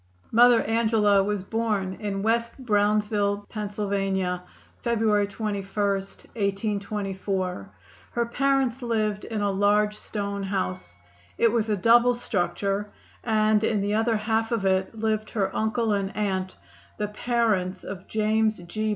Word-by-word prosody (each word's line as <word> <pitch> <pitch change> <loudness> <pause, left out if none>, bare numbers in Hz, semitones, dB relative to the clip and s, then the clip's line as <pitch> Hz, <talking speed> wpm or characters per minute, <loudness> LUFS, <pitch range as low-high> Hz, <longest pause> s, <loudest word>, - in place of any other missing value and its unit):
Mother 240 0 +6
Angela 220 -3 +3
was 205 -1 -2
born 205 -3 -1
in 200 -2 -3
West 230 +1 0
Brownsville, 210 -3 +1
Pa., 210 -2 -4
February 200 +2 -1
21, 200 0 -3
1824. 195 - -2 0.4
Her 235 0 -1
parents 265 0 +1
lived 215 -3 -1
in 220 -2 -3
a 205 -1 +1
large 205 +2 +2
stone 200 -2 -4
house. 90 - -3 0.4
It 230 - +4
was 225 -1 0
a 210 - +1
double 235 +5 +5
structure, 200 -2 -1 0.3
and 215 -1 +2
in 220 -1 +1
the 200 +1 -1
other 225 +1 +2
half 225 +1 0
of 225 -4 0
it 190 +3 +1
lived 215 0 -1
her 195 -4 -1
uncle 220 0 +1
and 200 0 -2
aunt, 190 -3 -1 0.4
the 210 -1 -2
parents 210 -4 0
of 195 -1 -8
James 215 0 +1
G. 215 +5 -3
210 Hz, 130 wpm, -25 LUFS, 195-225 Hz, 0.4 s, Mother